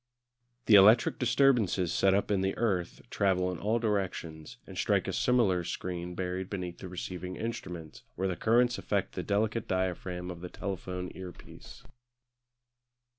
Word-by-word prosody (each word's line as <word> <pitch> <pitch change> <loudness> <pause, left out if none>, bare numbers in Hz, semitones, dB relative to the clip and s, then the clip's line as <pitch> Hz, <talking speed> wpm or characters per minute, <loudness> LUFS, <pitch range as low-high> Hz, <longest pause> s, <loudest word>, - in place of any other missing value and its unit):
The 110 - +4
electric 105 +4 +7
disturbances 120 - +3
set 95 0 +3
up 100 - 0
in 100 -2 +2
the 95 0 -1
earth 95 -7 -1
travel 90 -2 +1
in 90 - -6
all 110 +3 +1
directions, 95 -8 -3
and - - -11
strike - - +1
a - - -2
similar 110 -8 +2
screen 90 +1 -4
buried 90 +1 -3
beneath 90 -3 -5
the 95 - -7
receiving 90 0 -5
instrument, 90 -8 -6
where 95 +2 -1
the 90 - -1
currents 120 +4 +2
affect 100 -2 -1
the 90 - -3
delicate 105 +4 0
diaphragm 90 -1 -2
of 85 -1 -9
the 90 - -6
telephone 90 -2 -5
earpiece. 90 -1 -11
95 Hz, 150 wpm, -30 LUFS, 90-105 Hz, -, electric